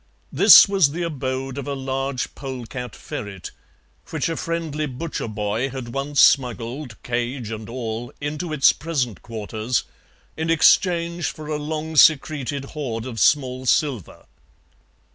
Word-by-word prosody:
This - - +9
was 190 -8 +3
the 175 +2 -3
abode 135 -3 -3
of 140 - -6
a 140 - -2
large 135 0 -3
polecat 125 -3 -7
ferret, 100 -3 -7 0.6
which - - -1
a 165 - -2
friendly 160 -3 -3
butcher 135 +1 -5
boy 110 +4 -2
had 125 -3 -7
once 140 +1 -2
smuggled, 125 0 +2
cage 120 -1 -3
and 110 0 -6
all, 120 -1 -5
into 150 +4 -4
its 150 -3 +5
present 130 - -3
quarters, 110 +1 -3 0.5
in 160 +1 -3
exchange 170 +1 +3
for 155 - -6
a 150 0 -2
long 155 +1 -4
secreted 145 -2 +3
hoard 120 -7 -4
of 120 -3 -6
small 130 0 +2
silver. 130 - 0
135 Hz, 135 wpm, -22 LUFS, 120-155 Hz, 0.6 s, This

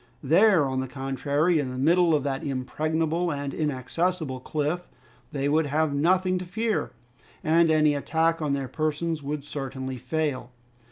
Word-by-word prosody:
There, 170 +2 +5
on 130 -1 -1
the 130 - -2
contrary, 140 +5 0
in 135 -3 -2
the 130 - -6
middle 165 +4 +4
of 145 - 0
that 140 +1 -2
impregnable 155 +5 -1
and 140 -1 -4
inaccessible 150 +1 -1
cliff, 155 +6 -2 0.4
they 140 -1 -1
would 155 +1 +2
have 150 +1 +1
nothing 185 +5 +2
to 180 - -6
fear, 220 +5 -2 0.5
and 165 +1 +4
any 155 -1 +4
attack 160 +3 0
on 150 -2 0
their 135 -1 -2
persons 155 +2 -2
would 145 0 -4
certainly 130 -2 -5
fail. 145 -2 -2
150 Hz, 155 wpm, -26 LUFS, 140-165 Hz, 0.5 s, There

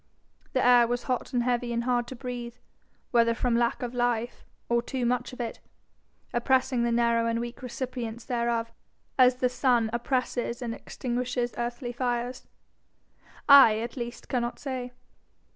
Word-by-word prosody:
The 255 -2 +2
air 245 -1 +6
was 245 +1 -2
hot 255 -1 -2
and 245 -2 +1
heavy 245 0 0
and 235 0 -1
hard 240 -1 0
to 260 - -7
breathe 245 -1 -6 0.6
whether 230 -1 +4
from 245 0 +1
lack 235 +1 +1
of 245 0 -4
life, 240 -1 -1 0.2
or 235 0 +2
too 250 +1 -3
much 245 0 0
of 250 - -11
it, 235 -2 -4 0.7
oppressing 255 0 +2
the 235 0 +1
narrow 235 0 +2
and 230 0 0
weak 240 0 -6
recipients 245 -2 -5
thereof, 235 -1 -1 0.5
as 250 0 +6
the 250 0 +1
sun 245 -2 +2
oppresses 240 -1 -1
and 230 -1 -3
extinguishes 245 0 -3
earthly 240 +1 -3
fires, 245 0 -3 1.0
I 275 -7 +9
at 235 +2 -4
least 240 -2 -6
cannot 240 -2 -1
say. 255 -3 -5
240 Hz, 155 wpm, -27 LUFS, 235-250 Hz, 1.0 s, I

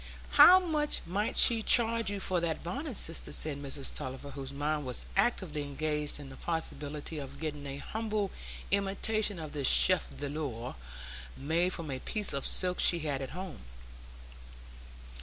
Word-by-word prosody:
"How 370 +1 +9
much 310 -5 0
might 200 +5 -2
she 230 -2 +7
charge 230 -1 +4
you 200 -1 -3
for 185 -2 -1
that 165 -2 -3
bonnet, 260 - -5
sister?" 165 - 0
said 145 -2 -1
Mrs 140 -1 -4
Tulliver, 135 0 -6
whose 135 -1 -7
mind 150 +2 -2
was 125 -2 -3
actively 190 -7 0
engaged 150 +1 -3
on 140 -2 -9
the 135 - -11
possibility 150 -1 -4
of 140 0 -8
getting 150 -2 -5
a 135 0 -6
humble 215 +3 -3 0.4
imitation 200 +1 +1
of 155 -3 -7
this 140 -3 -1
chef 185 -1 +5
d'œuvre 140 -5 -5 0.6
made 165 +6 0
from 160 -4 -4
a 130 - -4
piece 210 - +1
of 140 - 0
silk 180 -1 +1
she 170 -2 +4
had 145 -3 -2
at 135 - -5
home. 185 -4 -7
160 Hz, 160 wpm, -31 LUFS, 140-200 Hz, 0.6 s, How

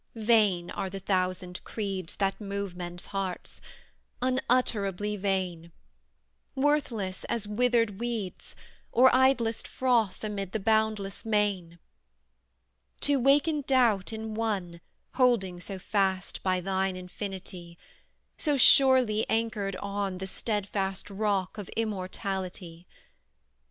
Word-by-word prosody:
Vain 210 -6 +3
are 190 - -3
the 195 +1 -6
thousand 185 -1 -1
creeds 195 -5 -4
That 195 +1 -1
move 200 -2 -4
men's 175 0 -5
hearts: 195 -2 -4 0.6
unutterably 220 -6 +1
vain; 185 -4 -2 0.8
Worthless 265 -9 0
as 220 -3 -2
withered 230 -2 +1
weeds, 230 -6 -4 0.4
Or 255 +2 +6
idlest 255 -3 +2
froth 235 -7 +1
amid 200 -3 -4
the 220 - 0
boundless 215 -1 0
main, 205 -6 0 1.2
To 285 -1 +2
waken 290 +4 +3
doubt 235 -8 +3
in 220 0 -5
one 195 -6 -2 0.4
Holding 220 -9 +2
so 195 +2 -6
fast 190 -1 -1
by 185 -1 +1
thine 190 0 0
infinity; 185 -2 -7 0.6
So 295 -3 +1
surely 255 -5 +6
anchored 215 -4 0
on 200 -1 -3
The 190 - -5
stedfast 195 -1 -3
rock 200 -1 -1
of 200 - -7
immortality. 185 -4 -4
200 Hz, 105 wpm, -28 LUFS, 185-225 Hz, 1.2 s, Or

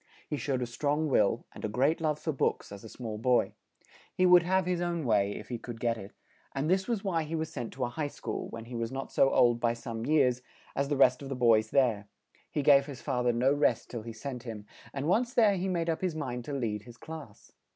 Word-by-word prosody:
He 150 - -2
showed 135 -3 -1
a - - -1
strong 145 +6 -1
will, 110 -2 +2
and - - -11
a 110 - -1
great 135 +9 +1
love 155 -2 +1
for 160 - -2
books, 135 - -1
as 100 -1 -9
a 110 - -9
small 110 -3 -6
boy; 125 +2 +2 0.6
he 185 - +2
would 180 -1 +8
have 185 +1 +1
his 180 -1 0
own 170 -3 -1
way, 100 -3 +2
if - - -9
he 120 -2 -4
could 115 -1 -8
get 115 -1 +1
it; 100 -2 -9 0.4
and 135 +2 -1
this 190 +2 +2
was 230 -5 -1
why 180 -5 0
he 155 +1 -4
was 160 -1 -3
sent 120 -4 -4
to 130 - -3
a - - -3
high 145 +4 -3
school, 115 -5 -5
when 115 0 -8
he 120 - -10
was 115 -1 -3
not 135 0 -5
so 135 - +4
old 120 -3 +4
by 120 0 +1
some 115 -1 -5
years, 130 -5 +3 0.3
as 140 0 0
the 145 - 0
rest 140 - +5
of 140 - -7
the 135 - -3
boys 115 -3 +4
there; 115 -7 +2 0.4
he 150 - -2
gave 140 -1 +6
his 140 -4 -7
fa 130 -4 -1
ther 125 0 +3
no 125 +4 +2
rest 145 -5 +1
till 120 - -4
he 115 +1 -7
sent 125 +3 -6
him; 110 -4 -7 0.3
and 140 +1 -3
once 235 +7 +1
there 215 -4 +5
he 185 +1 -2
made 170 -3 -1
up 165 -1 -1
his 180 -4 -1
mind 125 -5 -4
to 145 - -5
lead 110 -6 -2
his 115 +2 -14
class. 155 -9 -10
135 Hz, 255 wpm, -30 LUFS, 115-155 Hz, 0.6 s, would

